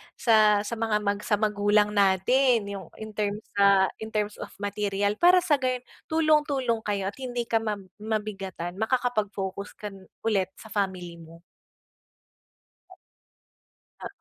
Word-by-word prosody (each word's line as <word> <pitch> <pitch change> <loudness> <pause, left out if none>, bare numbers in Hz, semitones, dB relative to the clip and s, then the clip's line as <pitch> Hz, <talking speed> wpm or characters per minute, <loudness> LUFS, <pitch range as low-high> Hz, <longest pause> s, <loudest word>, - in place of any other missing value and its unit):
sa 215 -3 +4
sa 215 +3 -4
mga 220 -2 +1
mag 200 0 0
sa 210 - +3
magulang 210 0 +2
natin. 210 +5 +3
Yung 190 -4 -7
in 220 0 -8
terms 210 0 -2
sa 200 -1 +5
in 220 - -5
terms 210 -1 -2
of - - -5
material, 205 0 -1
para 360 +1 +6
sa 295 -6 +2
gayon 255 -1 -1 0.2
tulong-tulong 295 -7 +2
kayo 200 -1 -1
at - - -21
hindi 245 -2 -3
ka 225 -1 +1
ma 215 -1 -2 0.2
mabigatan, 195 -5 -4
makakapag-focus 215 -5 -2
kan 195 -3 -9 0.2
ulit 200 -5 +1
sa 220 - -13
family 185 -4 -2
mo. 165 +1 -14 2.6
Oo. - - -4
210 Hz, 135 wpm, -26 LUFS, 200-230 Hz, 2.6 s, para